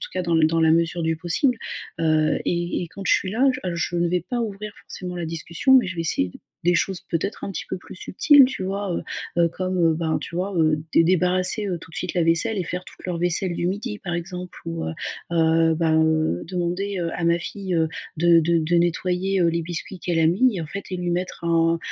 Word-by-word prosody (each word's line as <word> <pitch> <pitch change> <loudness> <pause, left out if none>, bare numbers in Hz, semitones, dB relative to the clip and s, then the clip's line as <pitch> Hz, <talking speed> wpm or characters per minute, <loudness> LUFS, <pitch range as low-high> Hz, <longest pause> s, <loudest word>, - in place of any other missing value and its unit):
tout - - -7
cas 185 - -2
dans 170 -1 0
l 155 -1 +4
dans 165 +1 +1
la 160 0 +5
mesure 165 +1 +1
du 160 0 +1
possible. 180 - 0 0.4
Heu, 155 -1 +2
et 175 0 -1
et 175 - -6
quand 195 +4 -9
je - - +4
suis 185 - -1
là 245 +6 +2
j 255 - -6
heu, 180 -2 -2
je 170 +1 -2
ne 170 0 +2
vais 175 0 -1
pas 245 -1 -1
ouvrir 210 -2 -4
forcément 180 -1 -7
la 175 -2 -4
discussion, 170 +10 +1
mais 255 - +6
je 185 - -4
vais 170 - -3
essayer 90 - 0
d - - -14 0.2
des 175 0 +4
choses 190 +1 0
peut-être 175 +5 -2
un 195 - -4
petit - - -5
peu 190 - -3
plus 180 - -12
subtiles, 275 +9 +5
tu 255 -7 -5
vois, 195 +1 -3
heu - - -3 0.4
heu, 170 - +4
comme, 185 +2 -3
heu, 165 -2 +4
ben 160 -1 -1
tu 170 - -8
vois, 185 +2 -2
heu, 155 -2 +2
dé 165 - +6
débarrasser, 185 +4 +2
heu, 185 -3 -1
tout 165 - -14
de - - -14
suite 180 - -3
la 175 - +2
vaisselle 165 +7 +2
et 185 - -1
faire 180 +2 -5
toute - - -15
leur 175 -2 -3
vaisselle 175 +1 +1
du 170 - -1
midi 210 +4 -3
par 175 -4 -4
exemple, 180 +1 -6
ou, 165 0 -4
heu - - -3 0.4
heu, 165 -1 +3
ben, 160 -1 +2
heu, 155 - +1
demander, 185 +2 -2
heu, 170 -1 -1
à 175 - -3
ma 170 0 +3
fille, 190 +1 -4
heu, 160 -1 +2 0.3
de 170 +1 +5
de 170 +1 +2
de 165 +2 +1
nettoyer, 180 +2 +1
heu, 170 - +4
les 170 0 0
biscuits 175 +3 -5
qu'elle 175 -2 -1
a 160 - +4
mis 205 +6 +3
et 165 - -3
en - - -6
fait 200 +6 -6
et 185 - -2
lui 175 -1 -2
mettre 175 0 -3
un 165 0 +2
175 Hz, 255 wpm, -23 LUFS, 165-185 Hz, 0.4 s, mais